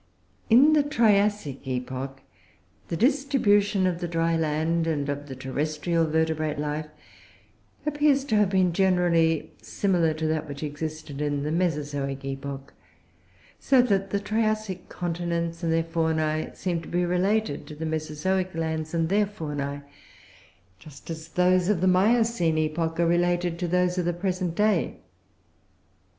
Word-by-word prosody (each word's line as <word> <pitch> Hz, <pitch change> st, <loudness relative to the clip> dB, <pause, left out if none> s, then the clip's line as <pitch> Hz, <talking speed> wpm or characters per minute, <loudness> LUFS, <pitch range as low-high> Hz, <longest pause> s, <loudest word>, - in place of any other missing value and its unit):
In 270 Hz, +7 st, +7 dB
the 300 Hz, -, +5 dB
Triassic 210 Hz, -, +1 dB
epoch, 130 Hz, +1 st, -4 dB, 0.6 s
the 165 Hz, -, -3 dB
distribution 215 Hz, -, +2 dB
of 180 Hz, -2 st, 0 dB
the 175 Hz, -, -3 dB
dry 165 Hz, 0 st, 0 dB
land 160 Hz, +1 st, 0 dB
and 145 Hz, -3 st, -1 dB
of 145 Hz, 0 st, -4 dB
terrestrial 155 Hz, +5 st, -1 dB
vertebrate 155 Hz, -1 st, 0 dB
life 150 Hz, +1 st, -3 dB, 1.0 s
appears 295 Hz, -2 st, +2 dB
to 220 Hz, -, 0 dB
have 210 Hz, -2 st, +3 dB
been, 185 Hz, -3 st, +2 dB
generally, 170 Hz, -4 st, +2 dB
similar 175 Hz, -5 st, 0 dB
to 160 Hz, 0 st, -3 dB
that 155 Hz, -1 st, -1 dB
which 140 Hz, +1 st, -6 dB
existed 150 Hz, -1 st, -5 dB
in 145 Hz, -1 st, -1 dB
the 150 Hz, -, -2 dB
Mesozoic 145 Hz, -5 st, -2 dB
epoch; 135 Hz, 0 st, -6 dB, 0.9 s
so 270 Hz, -2 st, +3 dB
that 195 Hz, -5 st, +1 dB
the 200 Hz, -, 0 dB
Triassic 215 Hz, -2 st, -2 dB
continents 170 Hz, -1 st, -3 dB
and 165 Hz, -2 st, 0 dB
their 165 Hz, 0 st, +2 dB
faunae 160 Hz, -1 st, -1 dB
seem 175 Hz, -3 st, -2 dB
to -, -, -11 dB
be 175 Hz, 0 st, 0 dB
related 185 Hz, -1 st, 0 dB
to 150 Hz, -, -9 dB
the 160 Hz, +2 st, -5 dB
Mesozoic 160 Hz, +4 st, -2 dB
lands 160 Hz, 0 st, -2 dB
and 165 Hz, -1 st, +1 dB
their 205 Hz, +3 st, +2 dB
faunae, 145 Hz, -7 st, -5 dB, 1.0 s
just 150 Hz, -, -11 dB
as 160 Hz, 0 st, -7 dB
those 180 Hz, +2 st, +2 dB
of 205 Hz, -5 st, +2 dB
the 185 Hz, -, +1 dB
Miocene 195 Hz, -3 st, +3 dB
epoch 160 Hz, +1 st, -1 dB
are 170 Hz, -, +4 dB
related 175 Hz, 0 st, +1 dB
to 180 Hz, -, -1 dB
those 180 Hz, +1 st, +1 dB
of 175 Hz, -, -1 dB
the 175 Hz, -, +1 dB
present 180 Hz, -1 st, -2 dB
day. 210 Hz, -3 st, +1 dB
165 Hz, 145 wpm, -26 LUFS, 155-190 Hz, 1.0 s, In